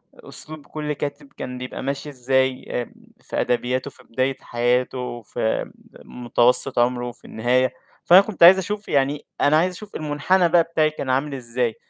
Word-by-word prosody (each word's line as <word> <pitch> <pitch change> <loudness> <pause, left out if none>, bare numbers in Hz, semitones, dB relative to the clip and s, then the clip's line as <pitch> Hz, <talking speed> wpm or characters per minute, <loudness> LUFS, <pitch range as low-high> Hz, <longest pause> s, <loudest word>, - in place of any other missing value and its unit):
أسلوب 155 -2 -3
كلّ 150 -1 -4
كاتب، 145 0 -6
كان 125 0 -6
بيبقى 125 +1 -6
ماشي 140 +2 -3
إزاي، 130 0 0
آآ 120 -2 -4 0.3
في - - -3
أدبياته 125 +1 -1
في - - -16
بداية 130 +3 -1
حياته، 125 0 -1
في 110 +1 -2 0.3
م 125 - -11
متوسط 125 +2 +2
عمره، 120 0 +1
في - - -20
النهاية، 125 +3 +1 0.3
فأنا 180 +3 +8
كُنت 200 -4 -1
عايز 185 +3 +10
أشوف 205 +3 -4
يعني، 140 +1 0 0.2
أنا 150 +2 +4
عايز 180 +3 +1
أشوف 210 +2 -11
المنحنى 160 +4 +1
بقى 170 -1 +5
بتاعي 160 -2 +1
كان 140 -3 -6
عامل 140 +3 0
إزاي، 120 -2 -2
135 Hz, 165 wpm, -22 LUFS, 125-155 Hz, 0.3 s, عايز